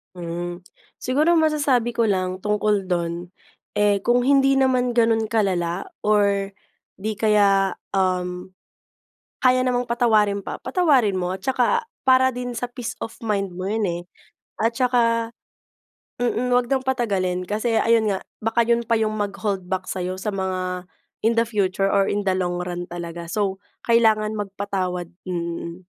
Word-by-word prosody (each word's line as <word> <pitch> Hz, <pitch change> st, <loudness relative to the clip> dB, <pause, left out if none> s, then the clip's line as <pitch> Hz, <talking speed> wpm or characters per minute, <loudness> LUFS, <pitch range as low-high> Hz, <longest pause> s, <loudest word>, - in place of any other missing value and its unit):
Hmm, 175 Hz, 0 st, -5 dB, 0.4 s
siguro 305 Hz, +6 st, +2 dB
masasabi 285 Hz, -7 st, +2 dB
ko 235 Hz, -, +1 dB
lang 185 Hz, -3 st, 0 dB
tungkol 210 Hz, -1 st, +1 dB
dun, 170 Hz, 0 st, -2 dB, 0.5 s
eh 205 Hz, -1 st, +3 dB
kung 245 Hz, +1 st, +2 dB
hindi 275 Hz, -1 st, +4 dB
naman 255 Hz, -2 st, +2 dB
ganun 225 Hz, -2 st, +2 dB
kalala? 185 Hz, -5 st, 0 dB, 0.2 s
Or 200 Hz, -2 st, +2 dB, 0.5 s
di 215 Hz, +2 st, -3 dB
kaya 200 Hz, -2 st, +3 dB, 0.2 s
um 180 Hz, -1 st, -1 dB, 0.9 s
kaya 255 Hz, 0 st, +4 dB
namang 245 Hz, -1 st, 0 dB
patawarin 215 Hz, -4 st, +3 dB
pa, 200 Hz, -, -7 dB
patawarin 265 Hz, -, +2 dB
mo 180 Hz, +1 st, -2 dB
at -, -, -9 dB
tsaka 265 Hz, -, +2 dB, 0.2 s
para 260 Hz, 0 st, +5 dB
din 245 Hz, 0 st, -5 dB
sa 245 Hz, +1 st, -4 dB
peace 245 Hz, -2 st, -5 dB
of 225 Hz, -, -4 dB
mind 205 Hz, -5 st, -1 dB
mo 185 Hz, +2 st, -6 dB
yun 215 Hz, +2 st, -1 dB
eh. 170 Hz, +1 st, -4 dB, 0.6 s
At 230 Hz, +1 st, +1 dB
tsaka 230 Hz, -2 st, +2 dB, 0.9 s
mm, 245 Hz, +1 st, 0 dB
wag 245 Hz, 0 st, +3 dB
nang 265 Hz, 0 st, 0 dB
patagalin 195 Hz, -9 st, -1 dB
kasi 220 Hz, +3 st, 0 dB
ayun 225 Hz, -1 st, +3 dB
nga, 190 Hz, -, 0 dB, 0.2 s
baka 225 Hz, +1 st, +2 dB
yun 235 Hz, 0 st, +2 dB
pa 230 Hz, -1 st, +1 dB
yung 215 Hz, -1 st, 0 dB
mag 205 Hz, -1 st, -1 dB
holdback 190 Hz, -3 st, -2 dB
sayo 185 Hz, 0 st, -3 dB
sa 200 Hz, +1 st, -3 dB
mga 185 Hz, -2 st, -3 dB, 0.3 s
in 230 Hz, +1 st, +2 dB
the 230 Hz, -, +3 dB
future 195 Hz, -3 st, 0 dB
or 195 Hz, 0 st, +2 dB
in 205 Hz, -1 st, -2 dB
the 190 Hz, -, +3 dB
long 175 Hz, -1 st, -1 dB
run 175 Hz, 0 st, -4 dB
talaga. 170 Hz, -1 st, -6 dB
So 200 Hz, -1 st, -1 dB, 0.2 s
kailangan 220 Hz, -2 st, +3 dB
magpatawad. 195 Hz, -3 st, -3 dB, 0.2 s
Mm. 170 Hz, 0 st, -5 dB
210 Hz, 150 wpm, -23 LUFS, 185-235 Hz, 0.9 s, para